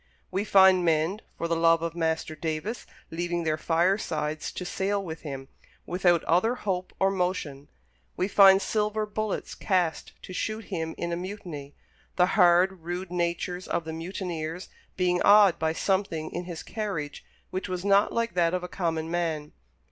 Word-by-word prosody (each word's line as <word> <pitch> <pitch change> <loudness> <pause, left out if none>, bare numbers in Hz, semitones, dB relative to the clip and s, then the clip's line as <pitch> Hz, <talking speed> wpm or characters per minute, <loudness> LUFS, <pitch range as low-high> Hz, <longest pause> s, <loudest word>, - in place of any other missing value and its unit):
We 190 +2 0
find 190 -3 +6
men, 165 +5 +1 0.2
for 170 - -2
the 165 - 0
love 165 0 +4
of 170 -1 -2
Master 160 -1 -1
Davis, 160 +9 -4 0.2
leaving 175 +1 -2
their 155 -1 +1
firesides 165 -2 0
to 180 - -5
sail 195 +2 -1
with 160 -2 -6
him, 135 -3 -6 0.4
without 175 -2 +2
other 185 +9 +2
hope 185 -6 -3
or 195 0 +3
motion; 180 -7 -2 0.5
we 185 - +1
find 195 -1 +7
silver 215 0 0
bullets 210 0 -3
cast 180 -5 -1
to 185 - -8
shoot 215 +3 -3
him 160 -2 -3
in 170 0 -3
a - - 0
mutiny; 175 -6 -7 0.4
the 180 - +5
hard, 180 0 +4
rude 175 +2 -5
natures 180 +1 -2
of 170 - -2
the 160 - -5
mutineers 170 0 -5 0.3
being 180 -1 +1
awed 205 -3 +6
by 160 0 +1
something 170 -3 -1
in 175 +1 -4
his 170 -2 -7
carriage 195 -10 -4 0.3
which 185 0 -4
was 180 +1 -4
not 200 +1 +4
like 230 0 -1
that 170 0 +2
of 180 - -3
a - - -4
common 165 -3 -2
man. 160 -4 -2
175 Hz, 165 wpm, -27 LUFS, 165-190 Hz, 0.5 s, find